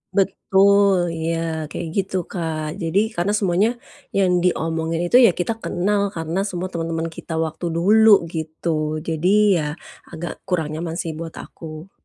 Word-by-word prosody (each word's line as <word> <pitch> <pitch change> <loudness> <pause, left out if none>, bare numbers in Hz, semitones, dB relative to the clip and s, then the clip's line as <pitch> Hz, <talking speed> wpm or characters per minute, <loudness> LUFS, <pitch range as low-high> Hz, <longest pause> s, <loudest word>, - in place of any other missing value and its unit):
Betul, 195 -2 +3
iya, 165 +1 -1 0.3
kayak 170 - -4
gitu, 190 -1 -1 0.2
Kak. 160 -4 -3
Jadi 165 +4 +1 0.2
karena 185 +4 0
semuanya 200 +2 +2 0.5
yang 180 -2 +3
diomongin 165 -1 0
itu 175 +8 +4
ya 205 - +6
kita 225 +6 0
kenal 200 +3 0
karena 165 +3 -2
semua 185 +1 -4
temen-temen 165 0 -2
kita 165 - -7
waktu 160 +2 -6
dulu, 215 +6 +5 0.2
gitu. 160 +1 -4 0.4
Jadi 165 +2 0 0.3
ya, - - -1 0.5
agak 170 +1 -5 0.2
kurang 165 -5 0
nyaman 165 +1 -4
sih 165 - -4
buat 165 -1 -7
aku. 160 +3 -10
175 Hz, 145 wpm, -21 LUFS, 165-190 Hz, 0.5 s, ya